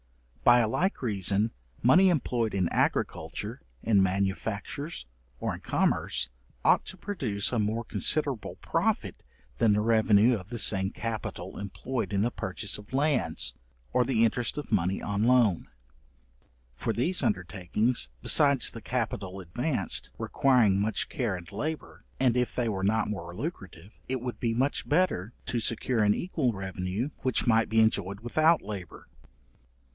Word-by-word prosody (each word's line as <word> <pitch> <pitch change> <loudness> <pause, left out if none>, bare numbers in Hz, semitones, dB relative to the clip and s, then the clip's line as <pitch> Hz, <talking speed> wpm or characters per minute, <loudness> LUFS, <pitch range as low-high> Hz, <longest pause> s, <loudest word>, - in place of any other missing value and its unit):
By 120 0 +7
a 115 - +2
like 180 - -1
reason, 100 0 +1 0.3
money 180 +11 +6
employed 120 - 0
in 95 -3 +1
agriculture, - - -1 0.2
in 105 -4 +4
manufactures, 100 - -2 0.3
or - - -2
in - - -7
commerce, 65 - 0 0.4
ought - - +5
to 190 - -8
produce 130 - -2
a 120 - +1
more 110 +2 0
considerable 140 -2 0
profit - - -1 0.4
than 115 -3 +4
the 105 - +2
revenue 110 +1 +4
of 95 0 -11
the 120 - -4
same 95 -3 +3
capital 115 0 -5
employed 115 +5 -4
in 100 -1 +1
the 120 - 0
purchase 100 +2 -3
of 105 - -14
lands, 135 - +1 0.4
or 125 - +4
the 115 -2 +3
interest 120 +3 -1
of 150 - -6
money 95 -2 +1
on 105 +1 -1
loan; 120 -8 +3 1.1
for 85 - -2
these 165 +12 +1
undertakings, 95 - 0
besides 140 -4 +4
the 115 - -9
capital 105 -6 -3
advanced, 95 - -2
requiring 120 -8 +3
much 110 +2 -1
care 115 -7 -1
and 90 +2 -9
labour, 150 +10 -5 0.2
and 125 -2 +3
if 125 -1 0
they 120 -2 0
were 95 -4 -2
not 110 +3 +2
more 85 -5 -5
lucrative, 100 - -7 0.2
it 130 0 -1
would 125 0 -5
be 115 -1 0
much 135 +4 0
better 145 - +1
to 120 - -1
secure 115 +1 0
an 105 0 +4
equal 155 -8 -1
revenue, 95 +6 -3
which 130 -1 0
might 115 -1 +3
be 110 - +3
enjoyed 100 -3 +1
without 155 +7 +3
labour. 100 -4 -8
110 Hz, 150 wpm, -28 LUFS, 100-125 Hz, 1.1 s, By